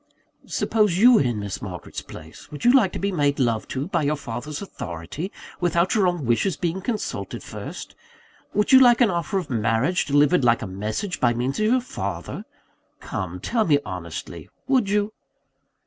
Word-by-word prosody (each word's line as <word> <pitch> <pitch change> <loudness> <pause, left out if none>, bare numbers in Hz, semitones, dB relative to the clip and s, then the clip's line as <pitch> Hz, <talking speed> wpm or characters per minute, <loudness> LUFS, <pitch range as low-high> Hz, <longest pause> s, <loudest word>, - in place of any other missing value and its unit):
"Suppose 210 -6 +1
you 245 +6 +7
were 225 - +5
in 120 -5 0
Miss 100 -1 -5
Margaret's 90 -3 -7
place, - - -12
would 150 - -7
you 245 - +7
like 220 -9 +5
to - - -4
be 200 +1 -1
made 145 -5 +1
love 115 -4 0
to, 135 +2 -3
by 175 - 0
your 150 +1 +1
father's 140 +2 -6
authority, 90 - -6 0.3
without 175 0 +2
your 205 -5 +3
own 175 -6 -1
wishes 140 - +1
being 175 +2 -2
consulted 220 +2 -4
first? - - -8 0.6
would 210 - +1
you 260 - +9
like 245 -2 +6
an 230 -5 +5
offer 175 +3 -1
of 170 -7 -4
marriage, 115 - +1
delivered 145 +2 +3
like 120 -1 +3
a - - -3
message, 105 - -4
by 120 -1 +2
means 125 - -2
of 215 - +2
your 250 +3 +3
father? 250 - -5 0.5
Come, - - -5
tell 230 -3 0
me 150 -7 +4
honestly, 90 -4 -7 0.2
would 255 -7 +2
you?" 210 +1 +1
165 Hz, 180 wpm, -23 LUFS, -, 0.6 s, you